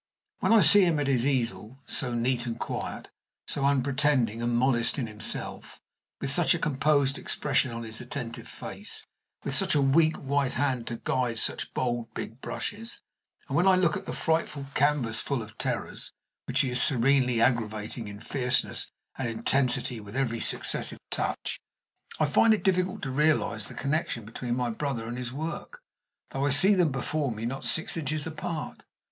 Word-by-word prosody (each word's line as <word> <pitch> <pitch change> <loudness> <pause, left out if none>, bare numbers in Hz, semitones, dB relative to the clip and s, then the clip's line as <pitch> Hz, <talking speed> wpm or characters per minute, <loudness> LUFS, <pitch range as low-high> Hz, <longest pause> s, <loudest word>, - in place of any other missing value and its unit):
When - - +1
I 225 -2 +7
see 205 0 +8
him 170 -4 +2
at 145 - 0
his 135 -2 +2
easel, 125 -3 -1
so 130 -3 -1
neat 120 +1 0
and 115 0 -4
quiet, - - -5 0.3
so 140 - -2
unpretending 135 -4 +2
and 120 0 +1
modest 120 0 +2
in 130 - -1
himself, 105 -1 -4 0.4
with 135 - 0
such 175 +3 +4
a - - 0
composed 140 -2 +2
expression 140 -2 +1
on 115 0 -5
his 110 0 -4
attentive 120 -1 -5
face, - - -4 0.4
with - - -2
such - - +2
a - - +4
weak 155 +4 +4
white 140 -1 0
hand 130 -3 -1
to 120 - -3
guide 125 -3 0
such - - -2
bold, 120 -2 -1
big 115 +4 -6
brushes, 225 +3 -5 0.5
and - - -3
when 180 +3 +4
I 190 - +7
look 185 0 +2
at 195 -1 -6
the - - -3
frightful 160 -3 -1
canvasful 140 -2 +1
of 105 0 -13
terrors - - -3 0.3
which 130 +3 +2
he 130 -3 -1
is 125 - +3
serenely 125 -2 +4
aggravating 115 -1 0
in 100 0 -8
fierceness 125 +1 0 0.3
and 125 -3 -1
intensity 120 +1 +1
with 105 +1 -10
every 120 -4 0
successive - - -1
touch, - - -2 0.6
I 155 - +4
find 220 +9 +5
it - - -7
difficult 185 -1 +1
to 135 - -2
realize 150 +3 +1
the - - -7
connection 140 -6 -1
between 120 +2 -3
my 125 -1 -1
brother 120 -2 -3
and 120 - -4
his 125 -1 -4
work, 165 - -6 0.5
though 135 +1 0
I - - +2
see 185 +10 +5
them 175 -6 +3
before 135 +1 -1
me 110 +1 -5
not 135 +3 -4
six 160 - 0
inches 155 -2 -2
apart. 160 0 -5
135 Hz, 175 wpm, -28 LUFS, 120-150 Hz, 0.6 s, see